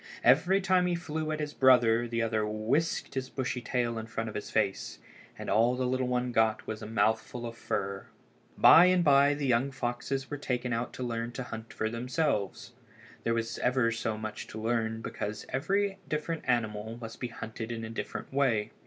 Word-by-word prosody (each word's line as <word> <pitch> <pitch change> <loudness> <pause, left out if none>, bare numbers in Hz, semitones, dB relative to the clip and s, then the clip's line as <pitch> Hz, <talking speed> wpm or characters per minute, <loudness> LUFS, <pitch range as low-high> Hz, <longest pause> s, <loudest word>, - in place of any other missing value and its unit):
Every 190 +2 +5
time 185 -1 +3
he 175 - +1
flew 160 -2 -3
at 155 - -2
his 150 -1 -3
brother 120 -3 +5
the 115 0 -1
other 110 -1 0
whisked 110 +10 -1
his 130 -1 -3
bushy 130 -1 -3
tail 120 -2 -1
in 110 - -7
front 115 0 -3
of - - -8
his - - -5
face, - - -1 0.4
and - - -7
all 120 +3 +3
the 130 0 -1
little 130 0 0
one 125 0 0
got 110 -2 +2
was 110 - -5
a - - -6
mouthful 110 +2 0
of 115 0 -6
fur. 100 -3 -3 0.5
By 170 - +9
and 180 -1 +4
by 140 -1 +5
the 145 -1 -3
young 125 +1 +2
foxes 135 +1 -3
were 145 - -3
taken 125 -3 -2
out 115 +1 -2
to 130 - -5
learn 115 0 -3
to 130 - -4
hunt 110 -1 -8
for 110 - -2
themselves. 115 - -2 0.5
There 115 - +2
was 115 0 -2
ever 125 -2 +2
so 110 -1 -2
much 110 0 -6
to 110 - -8
learn 115 0 -1
because 105 +1 -4
every 195 +8 0
different 155 +1 -2
animal 110 -2 -1
must 115 -1 -8
be 125 - -2
hunted 115 0 -6
in 115 -1 -4
a - - -7
different 115 - -6
way. 125 -7 +1
120 Hz, 195 wpm, -30 LUFS, 110-135 Hz, 0.5 s, By